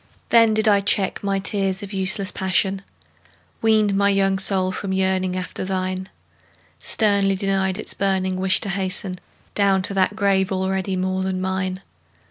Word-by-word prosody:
Then 230 -2 +5
did 220 +1 +2
I 200 -1 +4
check 200 0 0
my 200 -1 0
tears 195 0 0
of 200 0 -8
useless 195 +1 +1
passion, 190 0 0 0.8
Weaned 215 -2 +3
my 200 0 +3
young 195 -1 +1
soul 190 -1 +3
from 190 +1 -4
yearning 190 -1 0
after 185 0 -5
thine, 185 0 -3 0.7
Sternly 200 -3 +1
denied 190 -1 0
its - - -3
burning 190 -1 -1
wish 185 -1 +3
to 200 - -3
hasten 190 -1 -3 0.3
Down 195 -2 +2
to 200 - -1
that 195 +1 +1
grave 195 -3 +1
already 190 0 -1
more 185 0 -1
than 190 -1 -2
mine! 190 0 -3
190 Hz, 155 wpm, -21 LUFS, 185-200 Hz, 0.8 s, Then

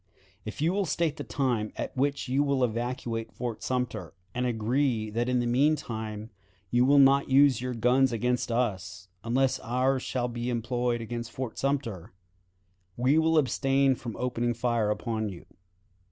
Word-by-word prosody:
"If 110 +5 -6
you 170 +3 +2
will 200 -2 0
state 155 0 0
the 145 - -4
time 120 -5 -1
at - - -5
which 140 +1 0
you 135 +3 +2
will 140 -2 +1
evacuate 115 -1 -2
Fort 120 -3 -5
Sumter, 120 -8 -3 0.2
and 125 +1 -1
agree 115 -1 0
that 120 +3 -1
in 125 - +2
the 120 - 0
mean 135 +6 +3
time 110 -5 -6 0.4
you 120 +1 +4
will 140 +2 +5
not 140 0 +5
use 135 -2 +5
your 125 -1 -3
guns 125 +3 +3
against 125 +1 -1
us, 95 -6 -2
unless 130 +3 +1
ours 130 +2 0
shall 125 -2 -2
be 120 0 -4
employed 120 0 -1
against 115 0 -5
Fort 130 -2 -5
Sumter, 115 -10 -2 0.8
we 130 +6 +3
will 160 0 +3
abstain 135 -1 +3
from 120 -3 -7
opening 120 -1 -1
fire 115 -2 0
upon 110 0 -2
you. 90 -3 -10
125 Hz, 165 wpm, -28 LUFS, 115-135 Hz, 0.8 s, will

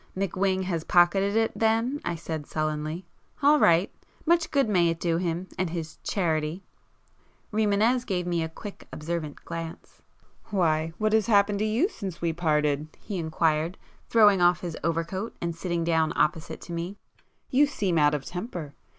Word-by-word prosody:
"McWhing 190 0 0
has 170 -4 -2
pocketed 195 +4 +3
it 225 0 +2
then,"—I 225 -1 0
said 160 -2 -5
sullenly—"All 155 - -1
right! 170 -2 +4 0.3
Much 335 0 +3
good 275 -4 +2
may 180 -5 +3
it 165 0 -2
do 165 -1 +1
him, 175 +1 -2
and 185 -2 0
his 160 -1 -6
'charity'!" 160 -1 -1 0.9
Rimânez 220 +3 +2
gave 185 -7 -2
me 175 -1 0
a 160 - -2
quick 200 +5 -10
observant 155 -1 -5
glance. 165 -1 -7 0.4
"Why, 165 -4 +1
what 215 0 +1
has 220 -2 +3
happened 205 -2 +3
to 215 - +1
you 225 - +2
since 195 - -7
we 170 -1 0
parted?" 150 -3 +1
he 200 -4 -5
inquired, 160 +1 0 0.3
throwing 205 -5 +6
off 175 0 +4
his 170 -3 -4
overcoat 165 +6 -2
and 170 -1 -3
sitting 170 0 -2
down 160 -1 +2
opposite 155 +1 0
to 170 - -8
me—"You 200 +10 -2
seem 195 - 0
out 150 0 +4
of 140 - -5
temper! 175 - -6
175 Hz, 155 wpm, -27 LUFS, 165-205 Hz, 0.9 s, throwing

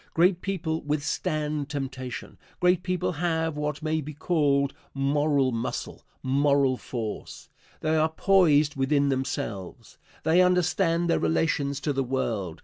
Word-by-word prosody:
Great 175 +1 +3
people 170 -5 -2
withstand 150 0 -2
temptation. 135 -3 -5 0.2
Great 180 -1 +3
people 180 -1 -1
have 160 -1 -1
what 150 0 -3
may 160 0 0
be 150 0 -8
called 145 -4 +1 0.2
moral 140 -1 +2
muscle, 115 -1 -4 0.2
moral 140 0 +3
force. 115 -4 -6 0.3
They 155 0 +1
are 155 +1 +3
poised 160 -4 +3
within 140 +1 +2
themselves. 130 - -4 0.2
They 160 +3 +4
understand 175 -1 +2
their 170 - +2
relations 145 -4 0
to 145 - -1
the 135 0 0
world. 110 -9 -2
150 Hz, 130 wpm, -26 LUFS, 135-160 Hz, 0.3 s, They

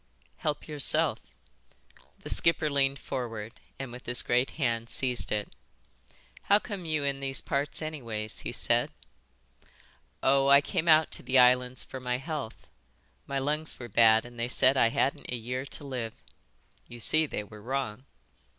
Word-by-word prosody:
"Help 150 -1 -3
yourself." 150 -3 +1 1.0
The - - -5
skipper 165 -2 +3
leaned 140 -1 +2
forward 115 -3 -6 0.2
and 135 -3 -6
with 125 +1 -11
his 125 0 +3
great 125 +2 +1
hand 115 -5 -1
seized 125 -2 -1
it. 105 -1 -1
"And - - -23 0.9
how 200 - +6
come 205 -4 -6
you 155 -2 -1
in 140 -1 -1
these 135 0 -2
parts 140 +3 -2
anyways?" 115 -9 -4
he - - -5
said. - - 0 1.3
"Oh, 135 0 +4
I 140 0 +8
came 160 +3 -2
out 155 -1 +5
to - - -4
the 130 +2 +1
islands 125 0 +4
for 130 - -8
my 125 -1 -1
health. 140 -4 -6 0.6
My 140 - -2
lungs 150 +3 +1
were 120 -1 -8
bad 110 +1 +5
and 120 -1 -12
they 120 - 0
said 130 +1 +3
I 125 - +4
hadn't 135 - -1
a 125 - -2
year 125 +3 -4
to 145 - -9
live. 125 -5 -5 0.7
You 120 - -11
see 155 +7 +3
they 105 - -4
were 105 +1 -13
wrong." 130 0 -3
130 Hz, 165 wpm, -29 LUFS, 120-140 Hz, 1.3 s, I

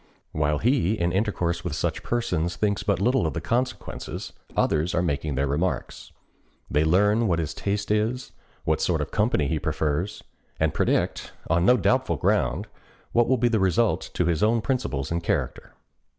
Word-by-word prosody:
While 75 0 +1
he, 115 - +2
in 85 -5 0
intercourse 90 -4 -1
with 85 -5 -3
such 80 0 -2
persons, 90 -9 -1
thinks 100 -2 0
but 100 -3 0
little 125 +6 +2
of - - -4
the - - -1
consequences, 125 +2 -3 0.2
others 80 +3 +1
are 85 - +2
making 75 -3 -1
their 70 +2 +1
remarks. 75 +1 -2 0.6
They 75 - +3
learn 105 +7 +3
what 85 -4 +2
his 80 -3 -2
taste 100 +1 -2
is, 110 +4 0 0.3
what - - 0
sort - - +1
of - - -4
company 75 - +1
he 80 0 -1
prefers, 80 +9 -2 0.4
and - - +1
predict, - - 0 0.2
on 85 +2 +3
no 125 - +6
doubtful - - +1
ground, - - +1 0.5
what 120 0 +3
will 130 - +3
be 120 +1 +2
the 115 -2 +2
result 95 +4 +1
to 90 - +1
his 85 -2 0
own 115 +2 +3
principles 110 - -2
and 85 0 0
character. - - -2
95 Hz, 175 wpm, -25 LUFS, 80-115 Hz, 0.6 s, no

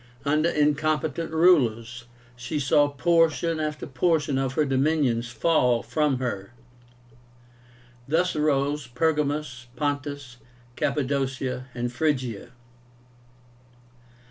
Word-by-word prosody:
Under 155 +3 +2
incompetent 150 +1 0
rulers, 120 -9 +2 0.3
she 125 +5 -4
saw 145 +1 +3
portion 165 +2 +1
after 150 -1 -3
portion 145 0 0
of 135 -1 -1
her 150 - +1
dominions 135 -4 +1
fall 125 -4 +2
from 135 +3 0
her. 120 -4 -4 1.5
Thus 170 +5 +1
arose 145 -2 0
Pergamus, 145 -2 -1
Pontus, 145 -3 -3 0.4
Cappadocia, 135 -2 -2
and 120 0 -3
Phrygia. 130 -7 -1
145 Hz, 90 wpm, -25 LUFS, 125-155 Hz, 1.5 s, saw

